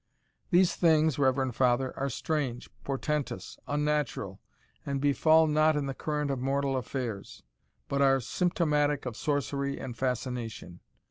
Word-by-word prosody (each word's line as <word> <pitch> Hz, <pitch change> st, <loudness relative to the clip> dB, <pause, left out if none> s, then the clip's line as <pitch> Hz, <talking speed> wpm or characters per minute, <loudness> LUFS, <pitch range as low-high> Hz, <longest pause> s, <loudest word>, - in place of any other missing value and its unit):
These 180 Hz, -1 st, +4 dB
things, 160 Hz, -4 st, +3 dB
reverend 130 Hz, -2 st, +1 dB
father, 130 Hz, 0 st, +2 dB
are 140 Hz, +1 st, -2 dB
strange, 135 Hz, -3 st, -3 dB
portentous, 145 Hz, +1 st, -3 dB
unnatural, 145 Hz, -8 st, -1 dB, 0.4 s
and 140 Hz, -1 st, -2 dB
befall 155 Hz, +3 st, +4 dB
not 155 Hz, 0 st, +3 dB
in 145 Hz, -1 st, -1 dB
the 135 Hz, -, -3 dB
current 150 Hz, +1 st, -2 dB
of 135 Hz, -, -2 dB
mortal 135 Hz, +1 st, 0 dB
affairs, 125 Hz, -5 st, -5 dB, 0.4 s
but 140 Hz, 0 st, 0 dB
are 135 Hz, -1 st, +5 dB
symptomatic 150 Hz, -1 st, 0 dB
of 125 Hz, -3 st, -4 dB
sorcery 140 Hz, 0 st, -2 dB
and 125 Hz, -3 st, -6 dB
fascination. 120 Hz, -7 st, -4 dB
140 Hz, 130 wpm, -29 LUFS, 130-150 Hz, 0.4 s, are